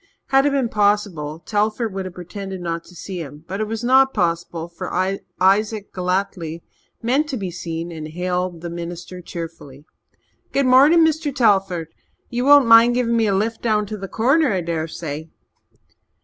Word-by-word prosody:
Had 270 +1 +4
it - - +4
been 275 -3 +1
possible 205 -8 0
Telford 215 +4 -1
would 190 -1 -4
have 185 - -8
pretended 190 +1 -7
not 170 -1 -3
to 180 - -16
see 180 +1 -6
him, 150 +1 -10
but 195 +3 -4
it - - 0
was 225 +1 -4
not 265 +2 +4
possible, 170 -3 -1
for 170 - -7 0.5
Isaac 205 +3 +2
Galletly 180 -3 -2 0.4
meant 275 +6 +1
to 265 - -2
be 190 -4 -4
seen 170 0 -5
and 155 -2 -6
hailed 180 +1 -3
the 170 -1 -5
minister 175 +1 -7
cheerfully. 165 -5 -8 0.7
"Good 275 - +2
mornin', 285 +6 +6
Mr. 315 -1 0
Telford. 195 - +2 0.4
Ye 240 0 -1
won't 285 +1 +7
mind 230 +1 +7
giving 235 -2 +1
me 225 -1 +2
a 200 - +2
lift 225 +3 -1
down 215 -2 +1
to 215 +1 -6
the 195 -1 -6
Corner, 270 - +2
I 190 -2 0
dessay?" 160 -2 -4
195 Hz, 170 wpm, -21 LUFS, 170-230 Hz, 0.7 s, won't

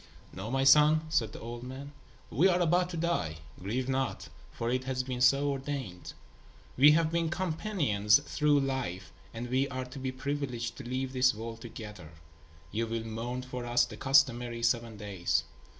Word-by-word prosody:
"Know, 95 +4 -6
my 135 +2 +1
son," 150 +3 +6
said 115 -9 +1
the - - -9
old 120 +1 -7
man, 130 +3 -8 0.4
"we 155 - +4
are 180 -1 +3
about 175 +1 +2
to 175 - -5
die. 160 - -1 0.2
Grieve 120 +7 -2
not, 135 -1 -2 0.2
for 115 +1 -3
it 130 +1 -1
has 130 -1 -1
been 125 -1 -4
so 140 +3 +4
ordained. 135 -10 -5 0.6
We 145 +3 +7
have 160 0 +2
been 170 -1 0
companions 155 - +2
through 145 0 +2
life, 125 -9 -3 0.2
and 120 +1 -5
we 130 +3 +1
are 130 -1 -4
to 130 +2 -9
be 130 0 -2
privileged 130 -3 -3
to 140 - -7
leave 130 +1 -2
this 130 -2 +3
world 115 +1 -7
together. 105 -9 -9 0.6
You 115 +2 -1
will 115 0 -3
mourn 120 +3 -4
for 125 -1 -6
us 120 0 +3
the 120 - -9
customary 120 -2 +2
seven 115 -2 0
days. 100 -4 -1
130 Hz, 175 wpm, -30 LUFS, 115-140 Hz, 0.6 s, We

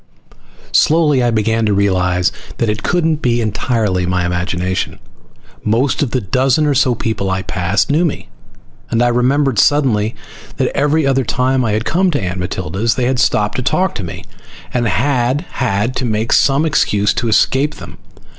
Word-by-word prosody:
Slowly 150 -4 +3
I 120 - +2
began 115 0 0
to 105 - +1
realize 90 -2 +1 0.3
that 115 - 0
it 105 - -5
couldn't 165 -3 +1
be 120 -5 0
entirely 105 -4 -1
my 90 -1 0
imagination. 90 +1 -2 0.7
Most 120 +5 +1
of 145 - 0
the 130 - -1
dozen 130 +8 +1
or 145 - +2
so 125 -2 +2
people 110 -4 -2
I 95 0 -2
passed 95 +6 -1
knew 155 +4 +2
me, 160 - -2 0.6
and 115 +1 +1
I 120 - +3
remembered 125 0 +1
suddenly 115 -7 +2 0.4
that - - -1
every 145 +2 +1
other 135 -1 +2
time 130 +2 0
I 110 -3 0
had 110 +2 -1
come 185 +3 +1
to 150 - -1
Aunt 95 -2 -4
Matilda's 95 +4 -2
they 125 - -1
had 130 0 0
stopped 105 -4 +1
to - - -1
talk 185 +9 0
with 90 - -4
me - - -8 0.5
and 120 -1 0
I - - +1
had 130 +1 0
had 115 0 -1
to 130 - -1
make 110 0 -1
some 140 +3 +3
excuse 105 -9 +1
to 120 0 -2
escape 135 +6 +2
them. - - -11
120 Hz, 180 wpm, -16 LUFS, 100-135 Hz, 0.7 s, Slowly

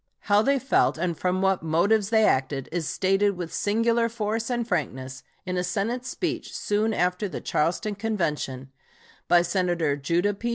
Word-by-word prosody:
How 205 0 +3
they 275 +4 +2
felt 270 -9 +2
and 170 0 -1
from 185 +3 -1
what 190 -1 +2
motives 195 +6 +2
they 220 -1 +4
acted 135 -2 0
is 165 -3 -2
stated 195 +1 +1
with 170 -2 -5
singular 230 +2 +1
force 225 0 -2
and 240 -2 -1
frankness 130 - -3 0.2
in 180 0 -2
a 180 - 0
Senate 220 +8 -2
speech, - - -3
soon 210 +2 0
after 180 0 0
the - - -5
Charleston 175 +7 -1
Convention, 150 - -3 0.6
by 175 -1 +5
Senator 175 -4 0
Judah 170 +8 0
P. 230 +4 -4
190 Hz, 165 wpm, -25 LUFS, 170-220 Hz, 0.6 s, by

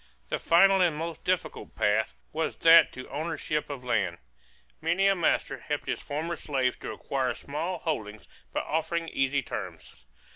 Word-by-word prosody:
The - - -1
final 195 +3 +5
and 170 -4 +3
most 165 0 -5
difficult 185 -1 -2
path 110 0 +1 0.2
was 160 +1 -1
that 165 0 +8
to 130 - -8
ownership 150 -1 -2
of 140 -3 -6
land. 95 -8 0 0.6
Many 175 +4 +2
a 195 - +6
master 160 -6 0
helped 145 +4 -3
his - - -2
former 160 +4 -3
slaves 130 -4 0
to - - -6
acquire 130 -2 -2
small 165 +6 -3
holdings 110 -11 -4 0.2
by - - -1
offering 165 +1 -1
easy 135 +1 +1
terms. 60 - -7
150 Hz, 155 wpm, -28 LUFS, 130-170 Hz, 0.6 s, that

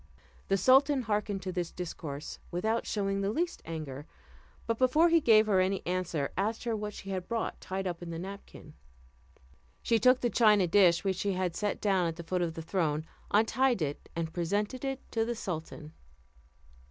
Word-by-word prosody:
The 195 - +2
sultan 265 - +4
hearkened 210 -3 -1
to 185 - -3
this 175 -2 -2
discourse 155 -4 -6
without 220 +6 -1
showing 195 -1 -1
the 195 - 0
least 345 +10 -2
anger; 155 -3 -6 0.6
but 230 -1 -1
before 300 +7 +4
he 335 -1 +4
gave 220 -4 +6
her 200 -3 +3
any 190 +1 0
answer, 175 -5 -1
asked 215 +4 -1
her 235 -2 -1
what 210 -1 -5
she 195 - -7
had 185 -2 -3
brought 230 -1 -3
tied 190 +1 -4
up 175 -2 -3
in 175 - -7
the 165 - -5
napkin. 195 +3 -9 1.1
She 230 -1 +2
took 255 +3 +5
the 240 - 0
china 210 -5 +5
dish 175 -1 +4
which 190 -2 0
she 200 0 0
had 180 -2 -1
set 210 -1 -2
down 190 -4 +2
at 165 - -3
the 170 - -8
foot 180 +2 -1
of 165 -2 -2
the 165 - -6
throne, 160 -3 -1 0.2
untied 225 0 +2
it, 145 -1 -5
and 165 -1 -3
presented 205 +9 -1
it 270 -1 -3
to 225 - +1
the 235 +1 -2
sultan. 160 -5 -6
195 Hz, 190 wpm, -30 LUFS, 170-225 Hz, 1.1 s, gave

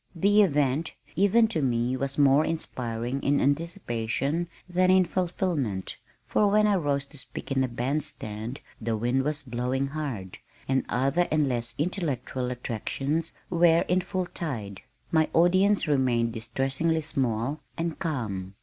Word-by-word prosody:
The 205 +5 +4
event, 150 -4 +1 0.2
even 205 +6 +4
to 185 -9 -1
me, 125 -1 +1
was 135 +1 -2
more 140 +1 +5
inspiring 125 -5 -3
in 140 0 +2
anticipation 145 - -1 0.2
than 185 +1 +2
in 185 0 +6
fulfillment, 170 - -2 0.3
for 210 - +2
when 210 +1 +4
I 210 - +4
rose 140 -4 0
to 145 0 -10
speak 135 - -8
in 135 -1 +2
the 130 - +2
band 125 +5 -1
stand 110 +5 -6 0.2
the 110 0 -1
wind 120 +4 +1
was 145 +1 -1
blowing 130 +2 -1
hard, 135 -11 -5 0.3
and 135 0 +1
other 140 +8 +2
and 150 -2 +2
less 120 -2 -2
intellectual 140 - -1
attractions 135 +6 -2 0.2
were 170 -1 +5
in 180 +1 +1
full 185 0 -2
tide. 110 - -5 0.3
My 160 -1 +3
audience 185 +4 +4
remained 125 -5 +2
distressingly 135 +8 0
small 135 -1 -1 0.2
and 165 -1 -2
calm. 105 - -3
140 Hz, 145 wpm, -27 LUFS, 125-170 Hz, 0.3 s, in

